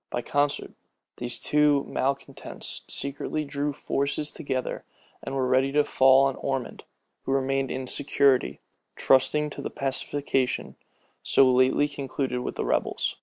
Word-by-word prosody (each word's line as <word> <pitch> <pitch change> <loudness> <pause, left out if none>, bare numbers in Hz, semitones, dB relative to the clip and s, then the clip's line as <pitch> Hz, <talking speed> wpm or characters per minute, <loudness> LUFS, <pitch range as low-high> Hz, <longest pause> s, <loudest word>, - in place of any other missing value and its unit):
By 120 - -3
concert, 145 +3 0 0.5
these 120 0 -3
two 150 -1 +3
malecontents 135 +1 -4
secretly 145 +2 -3
drew 145 +1 -2
forces 140 +2 -2
together, 130 -2 -4 0.4
and 135 - -5
were 130 -1 +1
ready 130 +2 +2
to 150 0 +4
fall 135 -1 +5
on 135 -1 -1
Ormond, 135 -3 -4 0.4
who - - -4
remained 135 0 0
in 130 0 -4
security, 135 0 +2 0.3
trusting 150 +3 +3
to - - -7
the - - -4
pacification 135 -1 -2 0.5
so 130 -1 +4
lately 130 +3 +3
concluded 135 -2 -3
with 125 - -4
the - - -2
rebels. - - -1
135 Hz, 135 wpm, -26 LUFS, 130-145 Hz, 0.5 s, fall